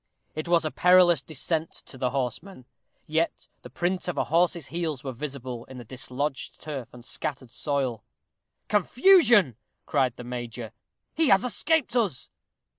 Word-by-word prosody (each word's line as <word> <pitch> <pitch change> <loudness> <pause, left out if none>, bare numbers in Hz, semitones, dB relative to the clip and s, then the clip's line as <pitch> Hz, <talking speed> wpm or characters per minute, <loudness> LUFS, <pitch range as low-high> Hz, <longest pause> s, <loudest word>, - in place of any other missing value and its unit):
It 155 +2 -4
was 170 -2 +3
a 155 - -1
perilous 180 -4 +5
descent 160 +2 -2
to - - -11
the 125 -1 -1
horseman, 130 - -4 0.4
yet 160 +2 -1
the - - -11
print 180 +1 -2
of 180 - -3
a - - +2
horse's 170 -1 +1
heels 165 -6 -3
were 135 - -3
visible 130 -2 -6
in 130 - -11
the 120 - -8
dislodged 130 +3 -4
turf 140 -6 -6
and 120 -1 -13
scattered 130 -4 -5
soil. 130 -7 -2 0.6
"Confusion!" 235 - +5 0.3
cried 125 -2 +1
the - - -9
major, 120 -2 -6 0.4
"he 320 0 +2
has 195 -4 +5
escaped 270 +2 0
us." 205 - 0
150 Hz, 150 wpm, -26 LUFS, 130-180 Hz, 0.6 s, perilous